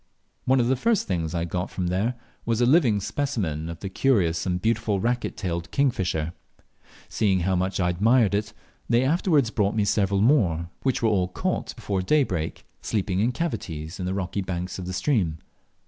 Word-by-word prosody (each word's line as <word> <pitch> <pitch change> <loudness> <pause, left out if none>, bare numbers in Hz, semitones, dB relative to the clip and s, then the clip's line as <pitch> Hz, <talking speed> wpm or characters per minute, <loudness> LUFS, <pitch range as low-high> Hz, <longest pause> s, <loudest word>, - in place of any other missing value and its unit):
One 130 +1 +4
of 120 - +3
the 130 - +3
first 220 - +1
things 85 -4 -2
I 85 0 0
got 90 +2 -3
from 90 - -3
there 95 +8 0 0.3
was 115 -1 0
a 120 - +4
living 125 -6 +4
specimen 95 - -2
of 85 0 -8
the 100 - -4
curious 95 -6 +1
and 90 -1 0
beautiful 110 -1 0
racquet 120 +4 -1
tailed 85 -5 -3
kingfisher. 90 - 0 0.7
Seeing 95 -4 +1
how 95 +2 +1
much 95 +2 -1
I 90 -1 +2
admired 110 +4 +3
it, 105 +1 -1 0.4
they 120 +2 +4
afterwards 150 - +2
brought 105 -2 +1
me 105 -2 +2
several 100 -1 +1
more, 90 - +2
which 130 -3 0
wore 110 - +4
all 95 -3 +2
caught 90 - -3
before 100 -2 -2
daybreak, 95 - 0 0.2
sleeping 95 -3 -1
in 115 +5 +2
cavities 95 - -4
of 90 - -2
the 95 - -1
rocky 100 +1 -2
banks 90 0 -4
of 90 - -6
the 95 - -4
stream. 90 - 0
100 Hz, 185 wpm, -25 LUFS, 90-120 Hz, 0.7 s, One